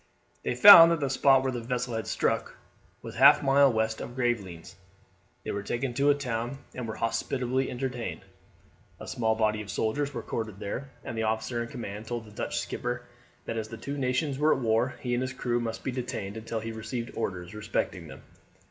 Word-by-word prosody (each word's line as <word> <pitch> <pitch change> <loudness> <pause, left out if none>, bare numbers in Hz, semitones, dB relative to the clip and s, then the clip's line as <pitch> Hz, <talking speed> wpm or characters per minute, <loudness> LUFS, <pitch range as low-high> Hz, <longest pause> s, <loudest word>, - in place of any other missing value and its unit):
They - - -2
found 170 -5 +11
that 165 - +1
the 140 -2 -1
spot 135 0 +4
where 130 - 0
the 120 -2 -4
vessel 125 0 -3
had 110 0 -3
struck - - -1 0.5
was - - -7
half - - +7
a - - -6
mile 135 0 +5
west 110 0 -1
of 120 - -7
Gravelines. 105 -10 -2 0.7
They - - -4
were 100 - -3
taken 120 +5 -3
to 140 +3 0
the 145 0 +5
town, 125 -2 -3 0.2
and 125 -2 -5
were 110 - -5
hospitably 130 +3 -1
entertained. 125 -1 -4 0.8
A - - -9
small 110 -2 0
body 110 -1 +1
of 105 - -10
soldiers 140 +9 -1
were - - -5
quartered 110 -3 -4
there, 125 +7 -5
and 115 - -6
the 110 - -2
officer 110 +2 -2
in 115 - -5
command 110 -4 -7
told 120 -1 -4
the 105 - -14
Dutch 105 - -4
skipper, 120 0 -4 0.4
that 115 - -4
as 110 -1 -3
the 115 +1 -8
two 140 +4 -5
nations 135 +1 -1
were 155 +1 +4
at - - -4
war 115 +1 +1
he 125 -1 -2
and 120 - 0
his 130 0 -3
crew 120 -2 -1
must 115 -1 -4
be 130 - -2
detained 120 -5 -4
until 110 0 -4
he 115 +1 -5
received 115 +2 -5
orders 90 0 -4
respecting 105 0 -3
them. - - -12
120 Hz, 210 wpm, -28 LUFS, 110-130 Hz, 0.8 s, found